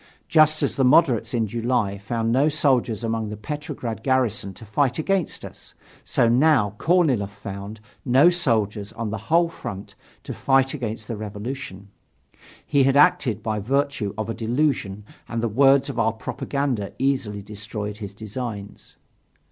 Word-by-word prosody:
Just 155 -1 +4
as - - -1
the 135 - +3
moderates 125 -3 +4
in 115 -3 +1
July 115 -2 -1
found 115 +2 -2
no 135 +5 +3
soldiers 130 -7 +1
among 115 -1 -2
the 105 - -6
Petrograd 135 -2 -5
garrison 125 -6 0
to 110 - -12
fight 125 +5 0
against 185 +2 -1
us, - - -13 0.3
so 115 - +2
now 125 -4 +3
Korniloff 150 - +2
found 100 +1 -8 0.2
no 135 +7 +5
soldiers 110 - 0
on 115 -2 -4
the 110 - -3
whole 170 +1 +4
front 100 - -8 0.3
to - - -6
fight 135 -1 +2
against 110 -6 -5
the 115 - -4
revolution. 105 -1 -7 0.8
He 140 - +2
had 135 +1 +3
acted 145 - +3
by 110 -2 -1
virtue 125 -3 -1
of 110 -1 -3
a 115 - -2
delusion 115 -5 -1 0.2
and 115 - -2
the - - +2
words 135 +4 +4
of 115 - -4
our 110 -1 +2
propaganda 125 -1 -3
easily 125 -7 -1
destroyed 105 0 -6
his 100 -2 -8
designs. 110 -1 -7
115 Hz, 155 wpm, -23 LUFS, 105-140 Hz, 0.8 s, no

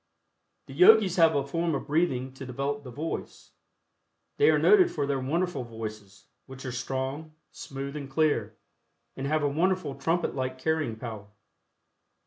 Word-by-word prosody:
The 135 - -11
Yogis 185 +3 +6
have 165 -2 +5
a 140 -1 +1
form 165 +2 -1
of - - -4
breathing 135 -5 0
to 135 - -9
develop 140 +3 -3
the 135 - -10
voice. 150 +7 -6 0.9
They 435 0 +5
are - - +4
noted 385 -3 +5
for 145 -3 -2
their 140 -1 -1
wonderful 155 +1 -1
voices, 110 -4 -8 0.2
which 135 0 -10
are 130 - -3
strong, 135 +5 -4 0.2
smooth 140 +1 -7
and 140 -2 -6
clear, 135 -8 0 0.6
and 135 - -4
have 155 +1 +1
a - - +3
wonderful 165 +1 0
trumpet 165 +6 -1
like 130 -1 -3
carrying 155 -4 -1
power. 110 -3 -8
140 Hz, 155 wpm, -27 LUFS, 130-160 Hz, 0.9 s, Yogis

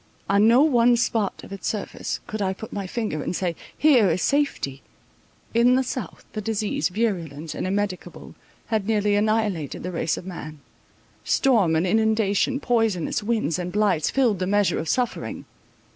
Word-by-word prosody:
On 200 +2 +4
no 240 +5 +6
one 245 -5 +4
spot 225 -4 -1
of - - -9
its 195 - -5
surface 210 -2 -3
could 215 0 -5
I 190 -1 0
put 220 +3 -9
my 200 -2 -4
finger 210 -8 -3
and 180 - -3
say, 175 -2 -1 0.2
here 255 -10 +5
is 170 +2 0
safety. 275 - 0 0.7
In 240 +2 +5
the 260 - +2
south, 250 -7 -6
the 215 - -3
disease, 210 -7 -1
virulent 170 -8 -2
and - - -3
immedicable, 200 -1 -3 0.4
had 215 -2 0
nearly 210 -2 +2
annihilated 205 -7 0
the 180 - -4
race 165 -3 -1
of - - -8
man; 155 -5 -8 0.6
storm 215 - +3
and 160 +3 +2
inundation, 220 +4 +2
poisonous 225 - 0
winds 210 -7 0
and 180 0 -4
blights, 200 -6 +1
filled 245 -7 +2
up - - -12
the 185 - -1
measure 205 0 +2
of 160 - -4
suffering. 250 -2 -2
205 Hz, 170 wpm, -24 LUFS, 180-230 Hz, 0.7 s, no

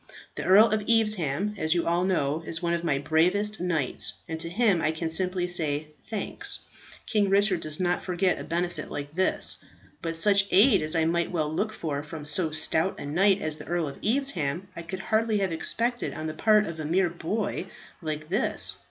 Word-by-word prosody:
The - - -6
Earl 205 +5 +7
of 215 0 +1
Evesham, 210 -5 +2
as 155 +2 +2
you 170 - 0
all 170 +1 +1
know, 160 -5 0
is 165 0 -1
one 170 0 -1
of 170 0 -2
my 150 -5 +1
bravest 180 +9 +1
knights, 165 -7 0
and 160 0 -5
to 165 - -1
him 200 -2 +2
I 155 - +1
can 160 +1 -3
simply 180 +1 +1
say, 155 -4 0 0.2
'Thanks; 215 -3 -1 0.4
King 205 -2 +1
Richard 200 -2 +3
does 155 -1 -4
not 180 -1 0
forget 180 0 0
a - - -6
benefit 175 +2 -3
like 145 0 -6
this.' 185 +1 +1 0.4
But 165 -1 -3
such 200 +3 +4
aid 205 +2 +5
as 155 +2 +2
I 160 -1 +2
might 170 +1 0
well 155 -3 -2
look 215 +6 -1
for 150 -8 -4
from 150 0 -9
so 160 +3 +1
stout 160 +3 +1
a - - -6
knight 195 +7 +2
as 155 -1 0
the - - -10
Earl 170 -2 -1
of 140 - -8
Evesham, 190 - -1
I - - -6
could 185 +3 -6
hardly 220 +1 +1
have 195 -3 0
expected 235 +9 -1
on 155 - -5
the 155 - -3
part 215 +5 +3
of 165 -3 -7
a 155 - -4
mere 175 +2 +1
boy 190 +3 -3 0.3
like 155 -1 -4
this. 200 +9 +1
175 Hz, 205 wpm, -26 LUFS, 160-200 Hz, 0.4 s, Earl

